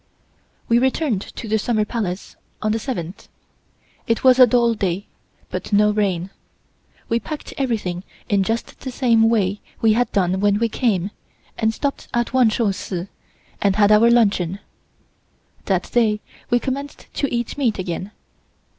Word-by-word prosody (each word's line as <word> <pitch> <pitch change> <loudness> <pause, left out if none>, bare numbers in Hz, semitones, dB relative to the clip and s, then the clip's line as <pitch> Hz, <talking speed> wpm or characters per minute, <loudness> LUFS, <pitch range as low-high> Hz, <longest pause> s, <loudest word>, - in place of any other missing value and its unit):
We 235 +1 +4
returned 260 - +1
to 225 - -8
the 220 +1 +1
Summer 215 -1 +1
Palace 205 -5 -4 0.2
on 215 - 0
the 225 - 0
seventh. 195 - -5 0.8
It 230 -2 0
was 260 -1 +6
a 255 - +9
dull 235 0 +3
day, 195 -2 -2 0.5
but - - -5
no 210 +1 +4
rain. 195 -3 -1 0.8
We 230 - +1
packed 300 +6 -7
everything 210 -9 -2 0.2
in 200 -1 +2
just 225 +4 -2
the 260 - -6
same 230 -3 +3
way 205 -3 +1 0.2
we 220 -1 +4
had 245 +2 +1
done 185 -1 +1
when 205 0 +3
we 230 +1 +1
came, 205 -5 0 0.4
and 220 -1 +1
stopped 280 +5 -3
at 240 +1 0
Wan 255 -3 +5
Shou 215 -2 +1
Si 185 0 -5 0.5
and 200 -1 +2
had 205 0 +4
our 215 +2 +6
luncheon. 200 -6 +2 1.1
That 185 -3 -1
day 215 -3 +2 0.3
we 240 - +4
commenced 275 +3 -4
to 280 - -1
eat 240 -1 -2
meat 240 -6 +1
again. 185 +1 -4
220 Hz, 155 wpm, -21 LUFS, 195-240 Hz, 1.1 s, a